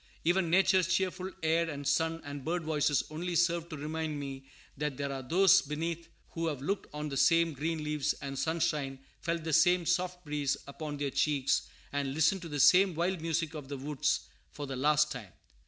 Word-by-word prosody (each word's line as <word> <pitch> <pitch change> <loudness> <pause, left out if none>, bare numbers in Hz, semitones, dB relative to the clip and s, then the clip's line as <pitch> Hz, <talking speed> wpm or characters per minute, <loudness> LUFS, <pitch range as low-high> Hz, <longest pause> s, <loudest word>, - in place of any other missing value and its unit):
Even 175 +1 +2
Nature's 190 0 +4
cheerful 185 0 0
air, 165 +1 +2
and 145 -2 -5
sun, 160 +3 +1
and 145 -1 -6
birdvoices 155 -3 +1
only 175 +3 -3
serve 170 0 +2
to 155 - -6
remind 155 0 -3
me 135 -1 -7 0.3
that 150 -2 -3
there 140 -1 -2
are 135 -1 -4
those 175 +9 +5
beneath 165 +3 -4 0.2
who 165 0 -2
have 150 -4 -2
looked 195 +9 -2
on 150 +1 -4
the 135 -2 -4
same 165 +2 +4
green 155 +3 -2
leaves 150 -1 0
and 135 -1 -6
sunshine, 155 -4 0 0.2
felt 170 -1 -2
the 160 -1 -2
same 175 +2 +4
soft 180 +1 -1
breeze 145 -2 -1
upon 145 +1 -6
their 140 -1 -2
cheeks, 140 -2 +1 0.2
and 140 -1 -1
listened 165 +5 +3
to 170 - -7
the 145 -1 -3
same 185 +4 +6
wild 175 +1 -1
music 165 -1 -1
of 150 -3 -7
the 140 0 -5
woods 150 +2 0 0.3
for 145 - -7
the 135 -1 -5
last 150 +3 +3
time. 115 -9 -7
155 Hz, 190 wpm, -31 LUFS, 145-170 Hz, 0.3 s, same